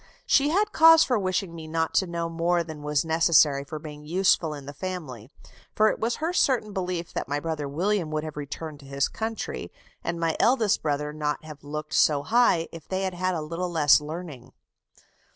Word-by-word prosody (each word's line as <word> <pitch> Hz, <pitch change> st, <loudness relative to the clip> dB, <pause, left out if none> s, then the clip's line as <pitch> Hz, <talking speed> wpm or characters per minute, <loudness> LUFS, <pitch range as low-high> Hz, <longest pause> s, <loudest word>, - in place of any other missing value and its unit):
She 285 Hz, +1 st, +3 dB
had 410 Hz, +6 st, +1 dB
cause 325 Hz, 0 st, +7 dB
for 245 Hz, -4 st, +1 dB
wishing 185 Hz, -2 st, -1 dB
me 160 Hz, -1 st, -8 dB
not 160 Hz, 0 st, -1 dB
to 190 Hz, -, +2 dB
know 170 Hz, -1 st, -3 dB
more 170 Hz, +1 st, 0 dB
than 160 Hz, -2 st, -9 dB
was 150 Hz, +1 st, 0 dB
necessary 160 Hz, -3 st, +4 dB
for 155 Hz, +2 st, -7 dB
being 150 Hz, -1 st, -9 dB
useful 175 Hz, 0 st, +2 dB
in 145 Hz, -2 st, -8 dB
the 145 Hz, -, -8 dB
family; 145 Hz, -, -6 dB, 0.5 s
for 215 Hz, 0 st, +4 dB
it -, -, -3 dB
was 230 Hz, +2 st, 0 dB
her 325 Hz, +3 st, -2 dB
certain 240 Hz, -, +1 dB
belief 180 Hz, -3 st, -3 dB
that -, -, -3 dB
my 145 Hz, +1 st, -1 dB
brother 155 Hz, -2 st, -3 dB
William 180 Hz, +3 st, 0 dB
would 155 Hz, 0 st, -2 dB
have 155 Hz, -1 st, -7 dB
returned 150 Hz, +1 st, -6 dB
to 140 Hz, -, -14 dB
his 140 Hz, 0 st, 0 dB
country, 225 Hz, 0 st, -5 dB, 0.3 s
and 170 Hz, -, -3 dB
my 165 Hz, -1 st, 0 dB
eldest 230 Hz, -5 st, +3 dB
brother 150 Hz, 0 st, -2 dB
not 150 Hz, 0 st, -2 dB
have 150 Hz, -2 st, -11 dB
looked 150 Hz, +1 st, -6 dB
so 145 Hz, -2 st, +3 dB
high, 200 Hz, -4 st, +3 dB
if 165 Hz, -3 st, -11 dB
they 190 Hz, 0 st, -2 dB
had 190 Hz, -1 st, -2 dB
had 185 Hz, +1 st, -1 dB
a 160 Hz, -, -2 dB
little 170 Hz, +4 st, -4 dB
less 150 Hz, -3 st, +5 dB
learning." 150 Hz, -4 st, -8 dB
165 Hz, 205 wpm, -26 LUFS, 150-185 Hz, 0.5 s, cause